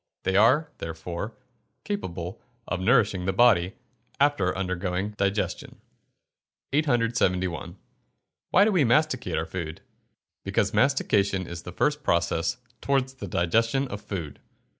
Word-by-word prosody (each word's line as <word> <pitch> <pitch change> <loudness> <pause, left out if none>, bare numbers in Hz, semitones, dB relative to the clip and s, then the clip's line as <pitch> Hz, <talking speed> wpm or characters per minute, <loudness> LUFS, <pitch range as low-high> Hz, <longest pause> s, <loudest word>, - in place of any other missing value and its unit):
They 95 - 0
are, 130 +10 +4
therefore, 85 +6 -5 0.5
capable 90 - -5 0.3
of 90 - -2
nourishing 100 -3 +3
the 95 - 0
body, 100 -4 +4 0.4
after 140 -11 +2
undergoing 90 +1 -2
digestion. 100 0 -2 0.9
871. 115 - 0 0.7
Why 200 - +5
do 220 - +3
we 180 -7 +3
masticate 125 - +1
our 80 - -1
food? 80 -3 -6 0.6
Because - - 0
mastication 100 -8 +2
is 85 -1 -7
the 90 - -8
first 150 - 0
process 85 -11 0 0.2
towards 135 -1 0
the 115 -6 -7
digestion 115 +11 +1
of 100 +1 -6
food. 95 -8 -6
100 Hz, 120 wpm, -26 LUFS, 90-130 Hz, 0.9 s, Why